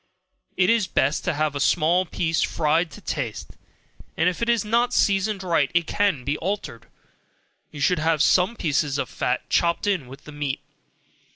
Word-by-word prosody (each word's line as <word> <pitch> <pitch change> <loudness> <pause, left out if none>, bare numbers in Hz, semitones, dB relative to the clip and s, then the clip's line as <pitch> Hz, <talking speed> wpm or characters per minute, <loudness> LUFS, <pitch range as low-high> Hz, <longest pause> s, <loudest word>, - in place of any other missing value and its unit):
It 185 +2 +4
is 230 -5 +2
best 140 +4 0
to 180 - 0
have 155 0 0
a - - -2
small 165 +6 +2
piece 165 0 -1
fried 160 +2 +1
to 210 - -13
taste, 115 - -4 0.7
and 165 - +2
if 180 +3 -1
it 235 - 0
is 235 -3 +2
not 235 +3 +1
seasoned 200 0 +1
right, 165 -6 +1
it 170 -1 +3
can 195 -8 0
be 140 +3 -1
altered; 165 - -4 0.8
you 150 - -10
should 180 +3 +2
have 160 -1 +2
some 185 +6 +3
pieces 145 -5 0
of - - -3
fat, 125 +1 -2
chopped 170 +2 +1
in 190 -10 0
with 135 +2 -12
the 150 - -11
meat. 145 -2 -3
165 Hz, 180 wpm, -23 LUFS, 145-190 Hz, 0.8 s, It